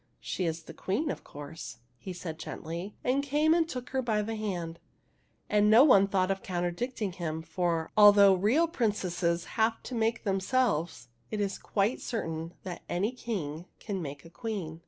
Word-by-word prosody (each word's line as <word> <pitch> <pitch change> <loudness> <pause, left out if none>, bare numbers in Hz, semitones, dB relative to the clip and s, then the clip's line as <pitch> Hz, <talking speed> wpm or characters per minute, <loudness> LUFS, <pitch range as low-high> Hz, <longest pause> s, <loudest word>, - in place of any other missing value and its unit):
" - - -44
She 185 - -1
is 165 0 -2
the - - -10
Queen, 285 +11 -1
of - - -7
course," 145 -3 -9 0.2
he 185 - -6
said 170 -3 -6
gently, 170 +5 -6
and 260 +3 +2
came 295 +3 +3
and 330 -1 +2
took 250 -4 -6
her 265 0 +1
by 220 -4 0
the 225 +2 -3
hand. 175 -6 -4 0.7
And 210 0 +3
no 225 +5 +8
one 200 -9 +6
thought 190 -1 +1
of 195 0 -2
contradicting 190 +5 -2
him, 160 -2 -4
for, 170 -2 -1
although 205 -2 +8
real 220 - +3
princesses 185 - 0 0.2
have 225 +1 +2
to - - -7
make 225 0 0
themselves, 195 - 0 0.2
it 215 - -3
is 200 -1 -1
quite 205 +4 0
certain 165 -7 -4
that 180 -2 -6
any 200 +6 0
king 180 - -4
can 200 -4 -4
make 140 -1 -7
a 165 - -13
queen. 185 -8 -5
195 Hz, 180 wpm, -30 LUFS, 170-225 Hz, 0.7 s, no